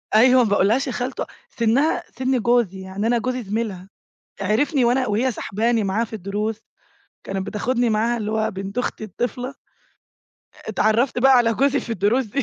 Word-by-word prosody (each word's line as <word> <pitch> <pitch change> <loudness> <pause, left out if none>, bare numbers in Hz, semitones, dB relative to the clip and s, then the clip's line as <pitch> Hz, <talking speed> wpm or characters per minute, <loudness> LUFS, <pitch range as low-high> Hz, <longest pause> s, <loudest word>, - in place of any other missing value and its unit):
أيوه، 250 +3 +6
ما 220 - 0
باقولهاش 220 +7 +2
يا - - -2
خالتو 250 +2 -3 0.2
سِنّها 245 +6 +1
سِن 260 0 +1
جوزي 235 -5 +1
يعني 190 +3 -3
أنا 240 +1 +3
جوزي 250 +1 -2
زميلها، 200 -3 -4 0.5
عِرفني 245 +7 +1
وأنا 255 +2 +2
وهي 235 +4 +1
ساحباني 225 +1 0
معاها 195 +4 0
في 225 - -14
الدروس 210 +2 -3 0.6
كانت 195 0 -4
بتاخدني 240 +3 0
معاها 225 +2 +1
اللي 215 -1 -3
هو 220 0 0
بنت 195 +3 -7
أختي 250 -3 -2
الطِفلة. 245 +5 -4 1.1
اتعرّفت 220 +4 +1
بقى 265 +1 +6
على 230 -2 +3
جوزي 280 +3 +2
في - - -9
الدروس 225 +6 +1
دي. 270 +6 -2
230 Hz, 165 wpm, -22 LUFS, 210-250 Hz, 1.1 s, أيوه